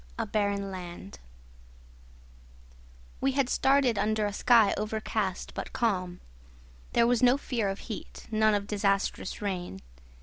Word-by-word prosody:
A -, -, -1 dB
BARREN 200 Hz, -2 st, -1 dB
LAND 175 Hz, -, -8 dB, 2.0 s
We 270 Hz, 0 st, +1 dB
had 270 Hz, -2 st, +1 dB
started 265 Hz, -5 st, +3 dB
under 215 Hz, 0 st, +1 dB
a 205 Hz, -, -2 dB
sky 230 Hz, -1 st, +5 dB
overcast 215 Hz, -2 st, -3 dB
but -, -, -6 dB
calm. 185 Hz, -6 st, -1 dB, 0.7 s
There 235 Hz, -, +4 dB
was 240 Hz, 0 st, +2 dB
no 250 Hz, +1 st, +5 dB
fear 235 Hz, -7 st, -2 dB
of 195 Hz, -, -5 dB
heat, 220 Hz, -, -8 dB
none 215 Hz, -1 st, +3 dB
of 200 Hz, 0 st, -1 dB
disastrous 200 Hz, -1 st, -1 dB
rain. 180 Hz, -, -3 dB
210 Hz, 130 wpm, -28 LUFS, 195-235 Hz, 2.0 s, sky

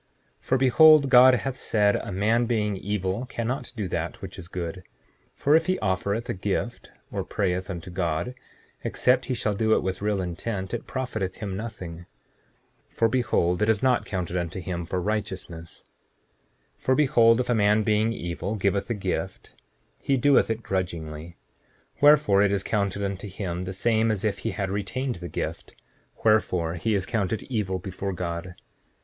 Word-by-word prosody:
7:6 -, -, -29 dB
For 130 Hz, -, +3 dB
behold, 145 Hz, +2 st, +6 dB
God 130 Hz, 0 st, +8 dB
hath 135 Hz, +1 st, -3 dB
said 105 Hz, -5 st, +2 dB
a -, -, -6 dB
man 110 Hz, +5 st, +2 dB
being 105 Hz, -3 st, 0 dB
evil 100 Hz, +3 st, -2 dB
cannot 125 Hz, +2 st, -3 dB
do 105 Hz, -5 st, -3 dB
that 85 Hz, 0 st, -3 dB
which 95 Hz, 0 st, -8 dB
is 85 Hz, -, -8 dB
good; 90 Hz, 0 st, -5 dB, 0.5 s
for 145 Hz, +2 st, +3 dB
if 165 Hz, +2 st, +3 dB
he 185 Hz, 0 st, +2 dB
offereth 100 Hz, +3 st, -1 dB
a -, -, -1 dB
gift, 90 Hz, -, -3 dB, 0.2 s
or -, -, -2 dB
prayeth 95 Hz, -1 st, -2 dB
unto 90 Hz, -1 st, -6 dB
God, 85 Hz, +4 st, -1 dB, 0.5 s
except 125 Hz, 0 st, +2 dB
he 130 Hz, -, -2 dB
shall 105 Hz, -2 st, -1 dB
do 110 Hz, +2 st, +2 dB
it -, -, 0 dB
with 95 Hz, 0 st, -3 dB
real 105 Hz, -1 st, 0 dB
intent 95 Hz, +2 st, -4 dB
it 120 Hz, -, -4 dB
profiteth 110 Hz, -8 st, -3 dB
him 100 Hz, -4 st, -5 dB
nothing. 90 Hz, -6 st, -7 dB, 0.8 s
7:7 -, -, -32 dB
For 115 Hz, -, +3 dB
behold, 110 Hz, -7 st, +1 dB
it 105 Hz, -, +2 dB
is 110 Hz, 0 st, +2 dB
not 130 Hz, -2 st, +2 dB
counted 90 Hz, -2 st, -3 dB
unto 85 Hz, +1 st, -3 dB
him 85 Hz, -1 st, -4 dB
for 90 Hz, +2 st, -2 dB
righteousness. 90 Hz, -4 st, -4 dB, 1.0 s
7:8 -, -, -33 dB
For 130 Hz, -, +3 dB
behold, 120 Hz, -6 st, +5 dB
if 125 Hz, -, -1 dB
a -, -, +4 dB
man 105 Hz, -1 st, +3 dB
being 110 Hz, +1 st, +2 dB
evil 90 Hz, 0 st, -4 dB
giveth 100 Hz, 0 st, 0 dB
a 115 Hz, -, 0 dB
gift, 100 Hz, -, -4 dB, 0.5 s
he 135 Hz, -, +1 dB
doeth 140 Hz, 0 st, +4 dB
it 115 Hz, +1 st, -2 dB
grudgingly; 85 Hz, -3 st, -4 dB, 0.6 s
wherefore 145 Hz, -9 st, +6 dB
it 100 Hz, -1 st, +3 dB
is 100 Hz, -1 st, 0 dB
counted 100 Hz, -1 st, -1 dB
unto 100 Hz, +1 st, -3 dB
him 90 Hz, -2 st, -4 dB
the 95 Hz, -, -4 dB
same 110 Hz, +3 st, +2 dB
as 110 Hz, -1 st, -1 dB
if 100 Hz, -2 st, 0 dB
he 115 Hz, -, -2 dB
had 100 Hz, -3 st, -3 dB
retained 120 Hz, +6 st, -2 dB
the 85 Hz, 0 st, -7 dB
gift; -, -, -5 dB, 0.5 s
wherefore 90 Hz, -7 st, +2 dB
he 105 Hz, +6 st, 0 dB
is 95 Hz, -2 st, 0 dB
counted 110 Hz, -1 st, -1 dB
evil 105 Hz, -7 st, -2 dB
before 95 Hz, +1 st, -5 dB
God. 90 Hz, 0 st, -5 dB
100 Hz, 180 wpm, -26 LUFS, 90-115 Hz, 1.0 s, God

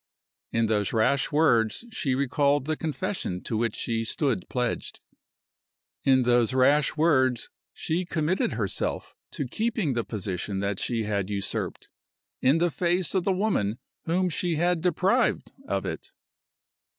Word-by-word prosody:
In 115 Hz, 0 st, +2 dB
those 105 Hz, -3 st, 0 dB
rash 135 Hz, +7 st, +2 dB
words 145 Hz, -, +2 dB
she 135 Hz, -11 st, -1 dB
recalled 140 Hz, +1 st, +1 dB
the 155 Hz, +1 st, 0 dB
confession 160 Hz, -, -3 dB
to 115 Hz, -, -3 dB
which 115 Hz, 0 st, 0 dB
she 115 Hz, -1 st, -1 dB
stood 120 Hz, -, -1 dB
pledged. 125 Hz, -2 st, -2 dB, 1.0 s
In 130 Hz, -1 st, +4 dB
those 120 Hz, 0 st, +3 dB
rash 145 Hz, +3 st, +3 dB
words 130 Hz, -6 st, +2 dB, 0.2 s
she 170 Hz, +3 st, -2 dB
committed 170 Hz, -1 st, 0 dB
herself 105 Hz, -4 st, -2 dB, 0.2 s
to 140 Hz, -, -3 dB
keeping 215 Hz, -, -1 dB
the 120 Hz, -1 st, -1 dB
position 95 Hz, -2 st, -4 dB
that 100 Hz, 0 st, -2 dB
she 115 Hz, -2 st, -1 dB
had 100 Hz, -2 st, -1 dB
usurped, 100 Hz, -1 st, -3 dB, 0.5 s
in 135 Hz, +5 st, +4 dB
the 175 Hz, 0 st, +2 dB
face 175 Hz, +2 st, +1 dB
of 185 Hz, -2 st, 0 dB
the 195 Hz, -, +3 dB
woman 185 Hz, -, 0 dB, 0.3 s
whom 180 Hz, +3 st, +1 dB
she 175 Hz, 0 st, -1 dB
had 175 Hz, +1 st, +1 dB
deprived 185 Hz, +8 st, +1 dB, 0.2 s
of -, -, -1 dB
it! -, -, -5 dB
135 Hz, 140 wpm, -26 LUFS, 115-170 Hz, 1.0 s, In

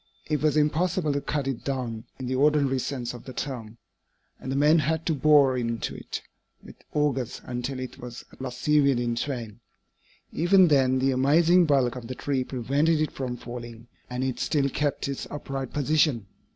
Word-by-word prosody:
It 150 Hz, -2 st, -1 dB
was 155 Hz, 0 st, +2 dB
impossible 155 Hz, +1 st, +1 dB
to 140 Hz, -, -1 dB
cut 145 Hz, -1 st, -2 dB
it 135 Hz, -4 st, -3 dB
down, 120 Hz, -5 st, -3 dB
in 130 Hz, -, -6 dB
the 125 Hz, -, -2 dB
ordinary 140 Hz, -1 st, +3 dB
sense 125 Hz, -2 st, -3 dB
of 120 Hz, -, -10 dB
the 130 Hz, -, -8 dB
term, 115 Hz, -5 st, -5 dB, 0.6 s
and 130 Hz, -, -5 dB
the -, -, -1 dB
men 150 Hz, +4 st, +5 dB
had 160 Hz, +1 st, -1 dB
to 165 Hz, -, +1 dB
bore 145 Hz, -2 st, +5 dB
into 115 Hz, -2 st, -2 dB
it -, -, -6 dB, 0.4 s
with -, -, -12 dB, 0.2 s
augers 135 Hz, -5 st, 0 dB
until 125 Hz, +2 st, -4 dB
it 130 Hz, +1 st, -7 dB
was 120 Hz, -1 st, -9 dB
at -, -, -13 dB
last 125 Hz, -1 st, -6 dB
severed 140 Hz, -1 st, +3 dB
in 120 Hz, -1 st, -1 dB
twain. 120 Hz, -4 st, -4 dB, 0.7 s
Even 180 Hz, +1 st, +5 dB
then 130 Hz, -3 st, +4 dB
the 135 Hz, +1 st, +2 dB
amazing 160 Hz, +7 st, +4 dB
bulk 135 Hz, -4 st, +2 dB
of 120 Hz, -2 st, -7 dB
the 130 Hz, -, -5 dB
tree 135 Hz, -1 st, -1 dB
prevented 140 Hz, +6 st, +1 dB
it 155 Hz, -1 st, 0 dB
from 125 Hz, -2 st, -4 dB
falling, 120 Hz, -1 st, -8 dB, 0.2 s
and 125 Hz, +1 st, -3 dB
it 130 Hz, -2 st, -2 dB
still 140 Hz, -3 st, +1 dB
kept 145 Hz, -2 st, -1 dB
its 140 Hz, -1 st, -4 dB
upright 135 Hz, -3 st, -5 dB
position. 145 Hz, -5 st, +2 dB
135 Hz, 185 wpm, -26 LUFS, 125-150 Hz, 0.7 s, men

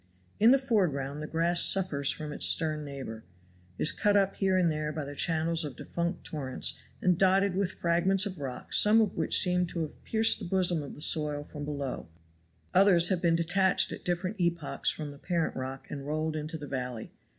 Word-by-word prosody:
In 220 Hz, -, +6 dB
the 270 Hz, -, +6 dB
foreground 155 Hz, -, -1 dB
the 155 Hz, -, -5 dB
grass 170 Hz, +2 st, +2 dB
suffers 155 Hz, -8 st, +2 dB
from 150 Hz, -1 st, -3 dB
its -, -, +4 dB
stern 155 Hz, -2 st, +2 dB
neighbor, 135 Hz, -6 st, -8 dB, 0.5 s
is 150 Hz, -, +3 dB
cut 205 Hz, -1 st, +2 dB
up 195 Hz, -1 st, +1 dB
here 190 Hz, -1 st, +1 dB
and 175 Hz, -3 st, +2 dB
there 150 Hz, 0 st, -3 dB
by 155 Hz, -1 st, -5 dB
the 145 Hz, -, -7 dB
channels 165 Hz, +2 st, +1 dB
of 145 Hz, -5 st, -6 dB
defunct 170 Hz, +5 st, -4 dB
torrents, 135 Hz, -5 st, -2 dB, 0.2 s
and 180 Hz, -2 st, +2 dB
dotted 195 Hz, 0 st, +3 dB
with 190 Hz, -1 st, -1 dB
fragments 180 Hz, +3 st, +1 dB
of 185 Hz, -5 st, -6 dB
rock, 130 Hz, -3 st, -6 dB
some 215 Hz, +2 st, +5 dB
of 215 Hz, -3 st, +1 dB
which -, -, +3 dB
seem 180 Hz, -1 st, +2 dB
to 170 Hz, 0 st, -4 dB
have 155 Hz, -, -7 dB
pierced 225 Hz, 0 st, +2 dB
the -, -, -7 dB
bosom 175 Hz, -2 st, +1 dB
of 140 Hz, -, -9 dB
the 150 Hz, -, -11 dB
soil 150 Hz, -2 st, +2 dB
from 145 Hz, 0 st, -8 dB
below, 140 Hz, -, -5 dB, 0.6 s
others 185 Hz, -3 st, +5 dB
have 185 Hz, -3 st, 0 dB
been 170 Hz, -2 st, +2 dB
detached 180 Hz, +3 st, +2 dB
at -, -, -8 dB
different 185 Hz, +4 st, -2 dB
epochs 170 Hz, -4 st, -1 dB
from 150 Hz, -2 st, -5 dB
the 145 Hz, -, -14 dB
parent 170 Hz, -1 st, -2 dB
rock 130 Hz, +1 st, -6 dB
and 140 Hz, -1 st, -6 dB
rolled 155 Hz, +1 st, -2 dB
into 155 Hz, +2 st, -5 dB
the 150 Hz, -, -8 dB
valley. 125 Hz, -4 st, -5 dB
165 Hz, 200 wpm, -29 LUFS, 145-185 Hz, 0.6 s, In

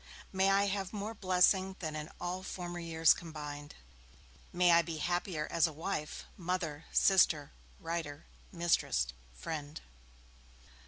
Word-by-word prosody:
May 190 Hz, +1 st, +3 dB
I 200 Hz, +1 st, +4 dB
have 195 Hz, -1 st, -2 dB
more 210 Hz, +2 st, -4 dB
blessing 190 Hz, -1 st, +3 dB
than 155 Hz, -3 st, -4 dB
in 150 Hz, 0 st, -5 dB
all 180 Hz, +1 st, -3 dB
former 175 Hz, -2 st, -5 dB
years 165 Hz, -1 st, +4 dB
combined! 150 Hz, -3 st, -7 dB, 0.8 s
May 175 Hz, 0 st, +4 dB
I 170 Hz, 0 st, +7 dB
be 165 Hz, -1 st, -5 dB
happier 175 Hz, -1 st, -1 dB
as 170 Hz, 0 st, +4 dB
a -, -, -5 dB
wife, 155 Hz, 0 st, -4 dB
mother, 165 Hz, -4 st, -3 dB
sister, 160 Hz, -7 st, +4 dB, 0.3 s
writer, 165 Hz, -4 st, -4 dB, 0.3 s
mistress, 170 Hz, -, +2 dB, 0.3 s
friend!' 145 Hz, -, -5 dB
170 Hz, 125 wpm, -33 LUFS, 155-185 Hz, 0.8 s, I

